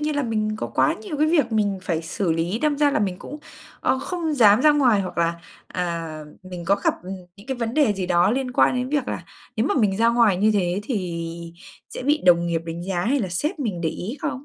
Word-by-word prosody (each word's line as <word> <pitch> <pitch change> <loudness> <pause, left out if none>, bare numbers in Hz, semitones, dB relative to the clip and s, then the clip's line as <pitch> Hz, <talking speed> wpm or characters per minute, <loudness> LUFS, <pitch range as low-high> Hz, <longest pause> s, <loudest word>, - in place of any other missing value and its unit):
nhiên 300 -1 -1
là 290 - +1
mình 215 -2 -1
có - - -3
quá - - +1
nhiều 370 -9 -5
cái 305 - +2
việc 295 -8 +2
mình 205 -3 +1
phải 165 -3 -2
xử 170 +1 -1
lý, 170 +6 -1
đâm 300 0 +1
ra 290 -1 +4
là - - +1
mình 190 -3 -1
cũng, 295 - -8 0.4
ơ, 260 - +1
không 330 -1 -3
dám 215 -3 +6
ra 305 - +6
ngoài. 255 -8 +3
Hoặc 185 -3 -5
là, 170 0 +2 0.3
à, 165 -3 -4 0.2
mình 180 -2 -8
có 195 +3 +3
gặp, - - +3
ừm, 185 +2 -7 0.2
những 200 +5 -16
cái 265 -2 -3
vấn 230 0 -3
đề 285 -9 +3
gì 190 -2 -3
đó 175 +2 +3
liên 255 0 -1
quan 250 - +3
đến 250 0 -2
việc 285 -2 -1
là - - -4 0.3
nếu 225 +5 +1
mà - - +1
mình 205 -7 +2
ra 230 +1 +3
ngoài 230 -5 +4
như 210 +3 +3
thế, 185 -1 0
thì 180 -9 -3 0.7
sẽ - - -7
bị 295 +3 +2
đồng 170 -1 +5
nghiệp 165 -1 0
đánh 165 +1 -5
giá 185 -1 -2
hay 275 +4 +1
là 190 - -2
sếp 295 - -2
mình 205 -11 -3
để 165 - 0
ý 210 - -5
không? 285 -4 -4
215 Hz, 255 wpm, -23 LUFS, 180-270 Hz, 0.7 s, dám